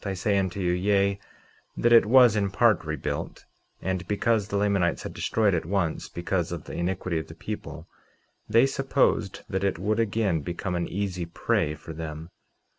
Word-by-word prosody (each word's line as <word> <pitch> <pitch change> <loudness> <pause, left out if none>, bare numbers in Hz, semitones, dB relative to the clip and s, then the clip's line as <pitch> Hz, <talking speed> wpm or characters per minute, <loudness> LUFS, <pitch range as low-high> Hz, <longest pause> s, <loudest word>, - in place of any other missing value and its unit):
I 100 -1 -3
say 100 +2 +1
unto 95 0 -2
you, 90 -2 +1
yea, 100 +2 +1 0.6
that 120 0 +3
it 115 -3 +7
was 125 -2 +6
in 100 -2 +1
part 110 -2 +3
rebuilt; 75 -3 -4 0.4
and 95 -1 -2
because 105 +1 +1
the 100 - -2
Lamanites 100 -4 +1
had - - -6
destroyed 105 -3 +1
it 85 - 0
once 85 -2 -1
because 85 0 -2
of 85 -4 -5
the - - -9
iniquity 90 -1 -2
of 80 - -7
the - - -11
people, - - -7 0.6
they 115 +4 +5
supposed 135 -7 0
that 95 0 -2
it 100 -4 0
would 105 +5 0
again 105 -6 +1
become 90 +4 -4
an 85 -1 -1
easy 90 -3 -3
prey 75 -2 0
for 80 - -10
them. 80 +1 -7
95 Hz, 180 wpm, -26 LUFS, 85-105 Hz, 0.6 s, it